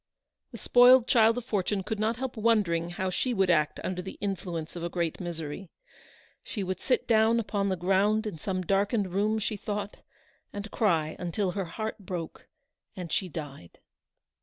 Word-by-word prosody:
The - - -8
spoiled 245 0 +6
child 225 -1 +5
of 245 - -4
fortune 200 -3 -1
could 215 +2 -4
not 220 +2 +1
help 255 +1 -4
wondering 205 -7 +2
how 185 +2 -2
she 245 +6 0
would 190 -2 +3
act 150 -3 +1
under 180 -1 -2
the 190 +1 -8
influence 180 -5 -4
of 170 - -5
a 170 - -2
great 170 -2 -2
misery. 170 0 -6 0.7
She 205 - -4
would 185 -1 -3
sit 255 - 0
down 225 0 +4
upon 200 -3 -1
the 190 - +1
ground 195 +5 +2
in 200 -7 -5
some 185 +2 -2
darkened 200 +1 +1
room, 210 +3 +1
she 215 0 -2
thought, 205 0 -4 0.5
and 205 +1 -6
cry 165 -8 +1
until 180 +2 -1
her 195 0 -3
heart 215 +7 -5
broke 180 -4 -6 0.5
and 180 -4 -6
she 185 - -1
died. 145 - -8
195 Hz, 175 wpm, -28 LUFS, 175-220 Hz, 0.7 s, spoiled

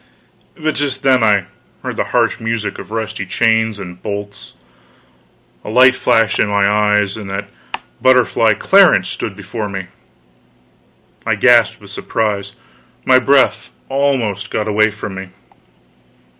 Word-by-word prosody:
But 155 0 -1
just 140 -2 -3
then 130 -3 +3
I 100 -4 +3 0.4
heard - - -4
the - - -1
harsh - - 0
music 115 -2 -3
of - - -10
rusty 110 -2 -4
chains 110 +2 +1
and 90 -3 -10
bolts, 100 0 -7 1.1
a - - -8
light 130 +3 +5
flashed 115 -3 +1
in - - +2
my 100 -1 +2
eyes, 105 -1 +1
and 105 -3 -8
that 100 +1 -5 0.5
butterfly, 125 -3 +3
Clarence, 185 - +4
stood 105 - -5
before 105 +2 -6
me! 95 -2 -6 1.3
I - - 0
gasped - - +4
with - - -14
surprise; 100 -3 -3 0.5
my 130 0 +5
breath 135 0 +2 0.2
almost 120 -8 -1
got 105 - -2
away 110 +1 +2
from 105 -1 -7
me. 95 0 -7
105 Hz, 135 wpm, -16 LUFS, 100-125 Hz, 1.3 s, light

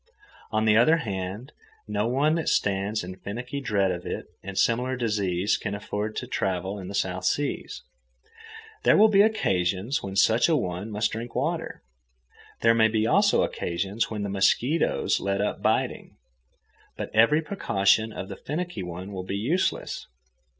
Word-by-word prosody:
On 110 0 0
the 105 -1 +5
other 140 +9 +5
hand, 100 - -5 0.4
no 105 +1 -1
one 140 +5 +2
that 165 -1 0
stands 100 +1 0
in 90 +1 -8
finicky 125 +8 -5
dread 100 -6 +1
of 90 -1 -4
it - - -5 0.2
and 95 0 -7
similar 125 +3 +2
diseases 105 -5 0
can 100 -2 -4
afford 105 +1 -4
to - - -3
travel 95 +1 -2
in 95 - -7
the 100 - -6
South 90 -1 -1
Seas. 145 +9 -2 1.0
There - - +5
will 220 +1 +7
be 200 -1 +5
occasions 100 - +1
when 95 -1 -6
such 110 - +4
a 165 - +4
one 90 -4 -3
must 105 +1 0
drink 115 +2 -6
water. 160 +6 -2 0.8
There 115 0 +5
may 110 -1 +5
be 110 0 0
also 115 - +4
occasions 95 +6 -2
when 105 -2 -4
the 100 - -3
mosquitoes 115 +10 +1
let 100 0 -1
up 105 - -1
biting. - - -1 0.8
But - - -5
every 115 +9 +4
precaution 110 - +1
of 95 - -6
the - - -7
finicky 170 - -4
one 90 +2 -6
will 95 -2 -4
be 95 +2 -3
useless. 150 - -1
105 Hz, 165 wpm, -26 LUFS, 95-125 Hz, 1.0 s, will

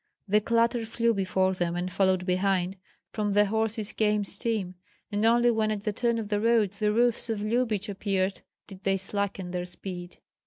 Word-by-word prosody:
The 210 +2 +3
clatter 230 +2 +2
flew 230 +1 +1
before 190 -1 +1
them 175 -2 -1
and 180 +1 -3
followed 185 -1 +2
behind, 185 0 +1 0.4
from 210 -2 -1
the 205 +1 +5
horses 220 0 -1
came 210 -1 +1
steam, 200 -3 -1 0.4
and 205 +1 -1
only 240 +1 +5
when 220 -1 +1
at 210 -2 -3
the 210 - -1
turn 235 +1 0
of 220 -2 -4
the 205 -1 +1
road 225 -3 +3
the 210 +1 0
roofs 235 +1 +2
of 215 -2 -2
Lyubich 220 -2 0
appeared 195 -1 -1 0.2
did 190 -1 -13
they 195 0 +2
slacken 195 -1 -3
their 180 0 -3
speed. 180 -1 -7
205 Hz, 185 wpm, -27 LUFS, 190-225 Hz, 0.4 s, the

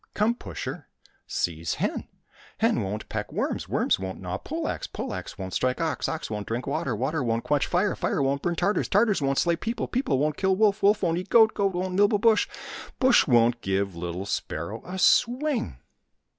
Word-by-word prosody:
124 230 +3 0
THE - - -11 0.7
SPARROW 85 - -1 1.0
AND - - +3
THE - - 0
BUSjH 105 +3 -4
peck - - -4
worms, - - -2
worms - - +1
won't 95 0 -5
gnaw - - -4
pole - - -4
axe, - - -3
pole - - -5
axe - - -7
won't 95 -1 -6
strike 130 0 0
ox, 165 -1 -1
ox 160 - -4
won't 105 -1 -4
drink 120 +2 -3
water, 135 -4 -1
water 135 +6 -1
won't 115 -1 0
quench 145 -1 +1
fire, 185 +4 +1
fire - - -1
won't 140 +1 0
burn 175 -1 -1
Tartars, 195 +5 +1
Tartars 205 -3 +3
won't 135 -1 0
slay 170 -1 +3
people, 230 +7 -3
people 245 - 0
won't 150 +2 0
kill 190 -1 +2
wolf, 210 0 +2
wolf 205 +1 +3
won't 170 -1 +1
eat 185 +1 -8
goat, 220 0 +6
goat 195 -2 0
won't 185 +1 -2
nibble 205 +3 +4
bush, 220 0 +3 0.5
bush 260 -2 +4
won't 120 -2 +3
give 95 -1 -1
little 85 +2 -4
sparrow 100 +2 -4
a 185 +1 -6
swing." 240 - +2
160 Hz, 195 wpm, -26 LUFS, -, 1.0 s, goat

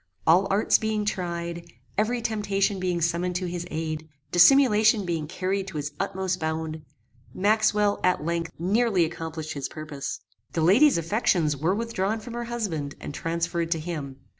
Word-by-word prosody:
All 180 +5 +5
arts 200 +2 +3
being 215 -1 -1
tried, 170 -3 -3 0.3
every 230 +3 0
temptation 205 -3 0
being 180 -2 -1
summoned 170 +2 0
to 180 +1 -1
his 175 0 -4
aid, 155 0 -4 0.2
dissimulation 215 +1 +6
being 165 -3 -2
carried 190 +3 -2
to 180 -5 -6
its 145 0 -3
utmost 190 -1 -1
bound, 160 -1 -3 0.5
Maxwell, 210 0 +2
at 180 -4 +2
length, 170 0 -2
nearly 195 +1 +2
accomplished 160 -1 -5
his 140 -2 -4
purpose. 155 -6 -6 0.3
The 165 - 0
lady's 220 - +5
affections 170 -3 +1
were 160 +7 0
withdrawn 220 -1 -1
from 235 +2 -9
her 240 0 -4
husband 185 -12 -3
and - - -7
transferred 170 +1 -2
to 165 -1 0
him. 155 -5 -5
180 Hz, 155 wpm, -26 LUFS, 160-210 Hz, 0.5 s, dissimulation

